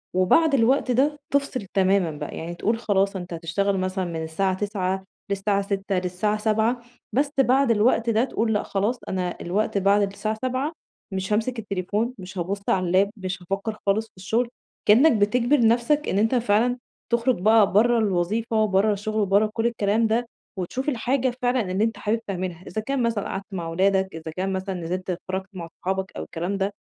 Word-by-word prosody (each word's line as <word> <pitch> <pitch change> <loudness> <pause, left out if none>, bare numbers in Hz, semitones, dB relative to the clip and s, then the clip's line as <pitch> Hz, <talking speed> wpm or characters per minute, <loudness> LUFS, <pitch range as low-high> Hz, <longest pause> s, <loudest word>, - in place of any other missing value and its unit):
وبعد 280 - +4
الوقت 260 +1 +3
ده 285 +4 +2
تفصل 280 -5 0
تمامًا 190 -3 +3
بقى. 150 - -6
يعني 170 +1 -5
تقول 225 +6 0
خلاص، 200 -3 +1
أنتَ 180 -2 -6
هتشتغَل 175 +4 -1
مثلًا 185 0 -1
من 165 -2 -4
الساعة 185 +4 0
09:00 190 -1 -2 0.3
للساعة 200 0 +1
18:00 195 0 -2
للساعة 185 +4 -1
19:00، 220 +3 +1 0.3
بس 280 +4 +1
بعد 265 -1 +4
الوقت 230 +1 +3
ده 225 +1 +3
تقول: 225 -4 0
"لأ، 210 - 0
خلاص 210 +5 -1
أنا 180 -2 -2
الوقت 200 +4 -1
بعد 200 +1 +4
الساعة 215 +2 -3
19:00 260 +4 -1 0.4
مش 190 +2 -2
هامسِك 225 +3 0
التليفون، 205 +3 -2
مش 190 0 -9
هابُصّ 190 +3 -2
على 185 -1 +2
اللاب، 190 +3 +3
مش 190 -1 -4
هافكر 195 +4 -3
خالص 205 +2 +2
في - - -40
الشغل." 225 +6 0 0.4
كأنَّك 255 +10 +7
بتجبَر 235 +4 +3
نفسَك 245 +6 +2
إن - - 0
أنتَ 225 +4 +2
فعلًا 240 +1 +2 0.3
تخرج 235 -1 +2
بقى 215 0 +5
برَّا 235 +4 +4
الوظيفة، 215 +3 +1
برَّا 205 +1 +2
الشغل، 215 +1 -1
برَّا 200 +2 +3
كل 225 +1 -1
الكلام 220 -1 +1
ده، 230 +2 0 0.3
وتشوف 250 - -2
الحاجة 255 0 0
فعلًا 245 -6 +1
اللي 190 +3 +1
أنتَ 225 -1 0
حابِب 215 +3 0
تعملها. 185 -2 -4
إذا 215 - -3
كان 270 +3 -1
مثلًا 230 -3 0
قعدت 195 +1 -4
مع 170 -3 -3
ولادك، 190 +3 +2
إذا 160 0 -6
كان 190 +1 -1
مثلًا 190 0 -3
نزلت 180 +2 -4
اتفرَّجت 190 +1 -3
مع 175 -3 -6
أصحابك 190 +1 -2
أو - - -3
الكلام 180 +4 -3
ده، 195 +1 -1
205 Hz, 185 wpm, -24 LUFS, 190-230 Hz, 0.4 s, كأنَّك